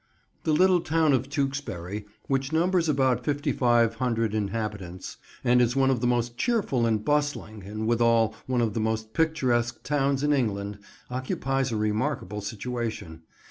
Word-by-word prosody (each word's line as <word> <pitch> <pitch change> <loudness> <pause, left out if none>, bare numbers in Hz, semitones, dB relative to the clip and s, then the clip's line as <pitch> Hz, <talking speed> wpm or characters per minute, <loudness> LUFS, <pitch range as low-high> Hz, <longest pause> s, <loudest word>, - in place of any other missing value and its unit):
THE 160 - +2
little 180 +3 +4
town 160 -2 +2
of 130 +1 0
Tewkesbury, 135 - -3 0.2
which 135 +1 0
numbers 170 +1 +2
about 130 -4 +2
5500 120 -4 +1
inhabitants, 105 -4 -4 0.3
and 125 0 +4
is 120 +1 +2
one 135 -1 +3
of 125 -3 0
the 120 - +2
most 120 -1 0
cheerful 195 - +1
and 110 -2 0
bustling, 145 -8 -1
and 110 +2 -4
withal 115 -1 +3
one 125 -2 +1
of 110 -3 0
the 115 - -1
most 110 0 -2
picturesque 130 -8 +1
towns 140 -1 +1
in 150 0 +3
England, 105 -6 -1 0.3
occupies 130 +1 -1
a 110 - -1
remarkable 105 -1 -1
situation. 105 -5 -5
120 Hz, 145 wpm, -26 LUFS, 110-140 Hz, 0.3 s, little